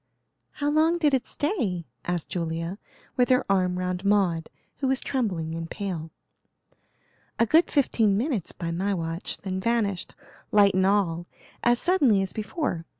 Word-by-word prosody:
"How 290 0 -1
long 320 +3 +3
did 300 -4 +2
it 260 - +1
stay?" 225 - -1 0.2
asked 175 -2 -2
Julia, 165 +2 -3 0.4
with 250 -1 +3
her 255 +1 +3
arm 185 -2 +2
round 180 0 -2
Maud, 190 -5 +2 0.3
who 270 - -1
was 265 0 +2
trembling 180 - -2
and 165 0 -5
pale. 180 -6 -4 1.3
"A 230 - +4
good 320 +9 +4
fifteen 225 -8 +2
minutes 235 - -1
by 170 -1 -4
my 195 +4 0
watch, 165 0 -4
then 190 -1 -4
vanished, 205 -3 -1 0.4
light 205 -1 +5
and 190 0 +3
all, 175 -4 +1 0.4
as 240 0 +4
suddenly 270 - +3
as 190 - -5
before. 215 - -3
200 Hz, 150 wpm, -26 LUFS, 175-250 Hz, 1.3 s, light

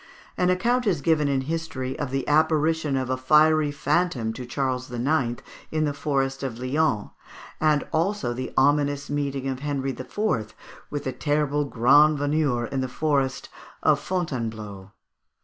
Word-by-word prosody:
An 180 0 +1
account 240 +7 +1
is 180 -7 +2
given 155 -2 +2
in 135 -1 +1
history 135 -3 -3
of 140 - -2
the 135 0 -2
apparition 155 -1 +2
of 130 -1 -2
a 130 - 0
fiery 150 +3 +4
phantom 140 -6 0
to 125 +1 -7
Charles 130 -1 -2
IX. 120 0 0 0.3
in 155 0 +1
the 145 - -1
forest 135 -2 -1
of 130 -4 -4
Lyons, 130 -3 0 0.5
and 155 -2 +2
also 165 -6 0
the 130 +1 -5
ominous 145 +1 +2
meeting 140 -2 -2
of 130 -1 -3
Henry 140 -1 -2
IV. 130 - -2 0.3
with 145 - -4
the 130 - -3
terrible 145 +2 0
grand 145 +5 +5
veneur 145 -4 0
in 135 +3 -3
the 130 - -1
forest 135 -1 -1 0.3
of - - +4
Fontainebleau. 110 - -4
140 Hz, 150 wpm, -25 LUFS, 130-155 Hz, 0.5 s, grand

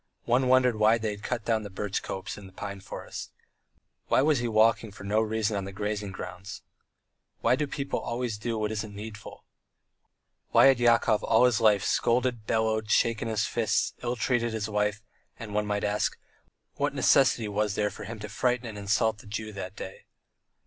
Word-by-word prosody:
One 125 +2 +2
wondered 125 -2 +4
why 110 +2 +5
they 110 -1 -2
had 105 0 -8
cut 120 0 -3
down 110 -2 +1
the 105 - -7
birch 100 +1 -3
copse 95 - -5
and 100 -2 -11
the - - -22
pine 100 0 -6
forest. 95 - -8 0.8
Why 130 - +3
was 150 -3 +3
he 120 - -1
walking 110 0 +3
with 100 - -13
no 105 +2 +1
reason 110 -1 0
on 100 -1 -2
the 100 - -6
grazing 105 0 -3
ground? 95 +1 -8 0.8
Why 120 +2 +4
do 150 +2 -1
people 140 0 -3
always 120 -3 -3
do 115 +1 -2
what 105 0 -1
isn't 110 -1 -4
needful? 105 0 -9 1.1
Why - - +7
had 135 -2 +6
Yakov 115 -2 +3
all 115 +2 +4
his 120 -3 +2
life 105 -3 +4
scolded, 120 -2 +1
bellowed, 110 -1 0
shaken 115 0 +2
his 110 -2 0
fists, - - 0
ill 120 0 -1
treated 120 0 0
his 110 -1 -2
wife, 105 0 -1 0.3
and, 110 -2 -8
one 105 0 0
might 105 0 -1
ask, 105 0 0 0.6
what - - 0
necessity 115 -3 +4
was 105 0 -1
there 105 -1 0
for 105 - -9
him 115 +3 -6
to 105 - -5
frighten 125 +3 0
and 110 -3 -6
insult 105 +2 +1
the 105 - -14
Jew 110 +1 -5
that 95 0 -6
day? 95 - -9
110 Hz, 190 wpm, -28 LUFS, 105-115 Hz, 1.1 s, Why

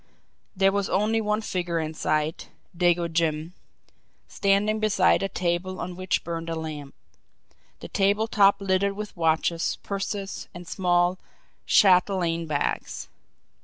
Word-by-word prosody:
There 195 0 +4
was 200 0 -1
only 215 +3 +1
one 210 0 0
figure 175 -5 -2
in 155 0 -3
sight 155 0 -1 0.3
Dago 175 -1 +2
Jim 160 0 -1 0.7
standing 205 +2 +1
beside 205 -3 +3
a 195 - -1
table 180 +1 -2
on 180 - -5
which 185 0 -1
burned 165 0 -5
a 165 - -2
lamp, 155 -3 -6 0.9
the - - -7
table 205 +2 +1
top 200 -2 +4
littered 195 +1 +1
with 210 +1 -7
watches, 165 0 0
purses, 195 0 -4
and 175 -1 -9
small 175 0 +1 0.5
chatelaine 180 -4 +3
bags. 145 -2 -2
180 Hz, 130 wpm, -25 LUFS, 165-200 Hz, 0.9 s, There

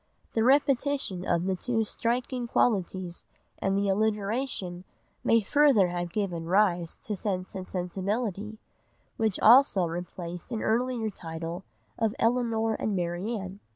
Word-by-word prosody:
The 225 - +2
repetition 270 -7 +2
of 170 0 +1
two 235 -3 0
striking 240 +3 -2
qualities 185 -6 0 0.4
and 195 0 +1
the 200 0 +1
alliteration 205 -2 -1 0.4
may 230 0 +4
further 250 -5 +4
have 175 0 -3
given 175 -5 -2
rise 180 -3 +2
to 210 - -3
Sense 185 -2 -3
and 185 -1 -6
Sensibility, 200 +3 -3 0.6
which 220 -4 0
also 225 -5 +6
replaced 175 +2 -6
an 225 - -2
earlier 230 -1 0
title 165 +1 -6 0.3
of 225 -2 +1
Elinor 230 -2 +1
and 215 -1 -2
Marianne. 190 +3 -3
205 Hz, 120 wpm, -28 LUFS, 180-230 Hz, 0.6 s, also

